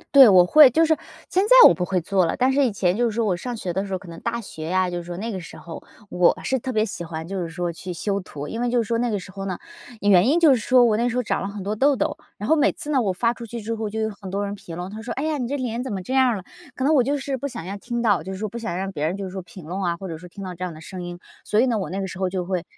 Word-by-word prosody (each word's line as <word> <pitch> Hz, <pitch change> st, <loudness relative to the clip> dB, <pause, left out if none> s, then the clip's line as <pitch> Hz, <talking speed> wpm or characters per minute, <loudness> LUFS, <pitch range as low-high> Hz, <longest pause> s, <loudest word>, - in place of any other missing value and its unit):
对， 270 Hz, -4 st, +10 dB
我 185 Hz, -3 st, +7 dB
会。 295 Hz, +8 st, +8 dB
就 325 Hz, +7 st, +3 dB
是 315 Hz, -, +3 dB, 0.3 s
现 375 Hz, -, +2 dB
在 -, -, +10 dB
我 -, -, +5 dB
不 180 Hz, -, -3 dB
会 185 Hz, 0 st, 0 dB
做 185 Hz, +1 st, +1 dB
了， -, -, -2 dB
但 260 Hz, +1 st, +3 dB
是 280 Hz, +1 st, +3 dB
以 250 Hz, -, +2 dB
前 185 Hz, -3 st, +1 dB
就 240 Hz, -, 0 dB
是 215 Hz, -, -6 dB
说 230 Hz, -1 st, +1 dB
我 190 Hz, -4 st, +1 dB
上 240 Hz, +7 st, -5 dB
学 180 Hz, -5 st, -4 dB
的 190 Hz, +2 st, -1 dB
时 200 Hz, -, -8 dB
候， 190 Hz, -, 0 dB
可 185 Hz, -, -14 dB
能 165 Hz, 0 st, -9 dB
大 235 Hz, 0 st, -2 dB
学 160 Hz, -7 st, -7 dB
啊， 185 Hz, 0 st, +2 dB
就 175 Hz, -1 st, -3 dB
是 175 Hz, -, -5 dB
说 175 Hz, 0 st, -7 dB
那 225 Hz, +4 st, -4 dB
个 190 Hz, -, -4 dB
时 170 Hz, -, -10 dB
候， 170 Hz, -, -9 dB, 0.3 s
我 180 Hz, -1 st, +3 dB
是 265 Hz, -, 0 dB
特 260 Hz, +2 st, -4 dB
别 215 Hz, -2 st, +1 dB
喜 195 Hz, -5 st, -5 dB
欢 160 Hz, -1 st, -6 dB
就 195 Hz, 0 st, -3 dB
是 170 Hz, -, -4 dB
说 175 Hz, +1 st, -3 dB
去 180 Hz, +2 st, -7 dB
修 195 Hz, +3 st, -2 dB
图。 150 Hz, -6 st, -8 dB
因 225 Hz, -, -4 dB
为 245 Hz, -, +1 dB
就 245 Hz, -, +1 dB
是 -, -, -10 dB
说 230 Hz, +1 st, 0 dB
那 245 Hz, 0 st, 0 dB
个 210 Hz, -, 0 dB
时 185 Hz, +1 st, -11 dB
候 195 Hz, +1 st, -6 dB
呢， 185 Hz, -2 st, -3 dB, 0.4 s
原 200 Hz, 0 st, +5 dB
因 310 Hz, +6 st, +3 dB
就 320 Hz, -5 st, +6 dB
是 -, -, +2 dB
说 245 Hz, +2 st, +4 dB
我 220 Hz, -2 st, +3 dB
那 240 Hz, +2 st, +1 dB
时 240 Hz, -, -4 dB
候 250 Hz, -, +1 dB
长 -, -, -1 dB
了 -, -, -3 dB
很 200 Hz, -1 st, -6 dB
多 205 Hz, +2 st, -2 dB
痘 275 Hz, +5 st, +3 dB
痘， -, -, -1 dB, 0.2 s
然 210 Hz, -, -5 dB
后 320 Hz, -, +5 dB
每 300 Hz, -2 st, +3 dB
次 300 Hz, -3 st, -4 dB
呢 270 Hz, -3 st, +3 dB
我 200 Hz, -5 st, +1 dB
发 230 Hz, +6 st, +1 dB
出 235 Hz, -, -10 dB
去 235 Hz, +2 st, -6 dB
之 225 Hz, +1 st, -4 dB
后 220 Hz, -1 st, -3 dB
就 220 Hz, +1 st, -3 dB
有 220 Hz, -, 0 dB
很 195 Hz, -, -7 dB
多 200 Hz, +2 st, -2 dB
人 200 Hz, -, -4 dB
评 195 Hz, -5 st, -9 dB
论， 180 Hz, +1 st, -4 dB
他 215 Hz, +1 st, -7 dB
说： 235 Hz, +2 st, -6 dB
“哎 275 Hz, -, -1 dB
呀， 310 Hz, -2 st, -1 dB
你 245 Hz, -, -2 dB
这 285 Hz, +3 st, -2 dB
脸 245 Hz, -3 st, -3 dB
怎 260 Hz, -, -5 dB
么 195 Hz, -, -2 dB
这 260 Hz, -, -4 dB
样 260 Hz, -1 st, +5 dB
儿 235 Hz, -, +1 dB
了？” 190 Hz, -, -6 dB, 0.3 s
可 260 Hz, -, -3 dB
能 300 Hz, +4 st, +3 dB
我 275 Hz, -, +5 dB
就 285 Hz, +4 st, 0 dB
是 275 Hz, 0 st, -3 dB
不 280 Hz, +2 st, -4 dB
想 170 Hz, -, -7 dB
要 195 Hz, +2 st, -5 dB
听 240 Hz, +3 st, -4 dB
到， 205 Hz, -5 st, +3 dB
就 190 Hz, -, -7 dB
说 210 Hz, +3 st, -3 dB
不 235 Hz, +4 st, -7 dB
想 220 Hz, -6 st, -4 dB
让 195 Hz, +1 st, -3 dB
别 155 Hz, -4 st, -2 dB
人 180 Hz, +4 st, -2 dB
就 195 Hz, -1 st, -4 dB
说 190 Hz, -, -5 dB
评 180 Hz, -1 st, -13 dB
论 185 Hz, +5 st, -4 dB
啊， 170 Hz, -2 st, -1 dB
或 190 Hz, -, -7 dB
者 165 Hz, -, -5 dB
说 180 Hz, +1 st, -12 dB
听 195 Hz, +2 st, -9 dB
到 185 Hz, -, -5 dB
这 180 Hz, +1 st, -7 dB
样 180 Hz, -, -3 dB
的 155 Hz, -, -11 dB
声 185 Hz, +3 st, -8 dB
音。 175 Hz, 0 st, -6 dB, 0.3 s
所 210 Hz, -, +1 dB
以 250 Hz, -, +5 dB
呢， 245 Hz, -3 st, +1 dB
我 -, -, -4 dB
那 190 Hz, -, -3 dB
个 -, -, -2 dB
时 185 Hz, -, -8 dB
候 185 Hz, -1 st, 0 dB
就 180 Hz, -1 st, -3 dB
会 180 Hz, -2 st, -2 dB
200 Hz, 385 characters per minute, -23 LUFS, 180-245 Hz, 0.4 s, 对